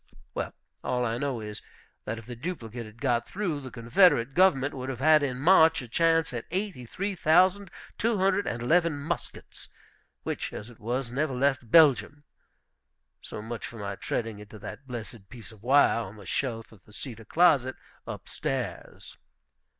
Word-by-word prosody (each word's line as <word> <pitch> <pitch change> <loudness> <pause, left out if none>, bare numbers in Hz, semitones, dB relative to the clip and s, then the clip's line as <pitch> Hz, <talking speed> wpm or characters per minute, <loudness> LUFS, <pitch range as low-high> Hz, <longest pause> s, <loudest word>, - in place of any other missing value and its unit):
Well, - - -3 0.3
all 125 -1 0
I 115 0 -1
know 135 -4 -2
is, 105 -1 -7 0.4
that 115 - -3
if 115 - -10
the 120 +1 -7
duplicate 120 -6 -6
had 110 +2 -15
got 120 -3 0
through, 180 -7 -2
the 130 - -7
Confederate 120 +2 +3
government 145 -6 +4
would 130 -1 -5
have 130 - -4
had 155 +2 +6
in 130 -3 -1
March 160 +1 +6
a - - -9
chance 165 +3 +2
at 120 -1 -4
eighty 185 - -3
three 200 - -3
thousand 185 +3 +3 0.3
two 230 -1 +1
hundred 195 +1 +2
and 120 0 -3
eleven 165 +3 +3
muskets, 155 +3 -6 0.5
which, - - -4
as 110 +4 -7
it 115 - -18
was, 120 +2 -3
never 135 +1 -1
left 130 -2 +1
Belgium. 145 -1 +5 1.0
So 105 - -7
much 115 +1 -6
for 115 - -11
my 100 -2 -4
treading 110 +1 -3
into 105 +1 -11
that 135 +6 -9
blessed 115 -4 -8
piece 115 -3 -11
of 110 -3 -16
wire 135 0 +4
on 110 -3 -6
the 100 -2 -13
shelf 115 +1 -3
of 105 -5 -18
the 105 - -18
cedar 110 +1 -7
closet, 140 -3 +3 0.3
up - - -7
stairs. - - -5
130 Hz, 175 wpm, -28 LUFS, 115-160 Hz, 1.0 s, had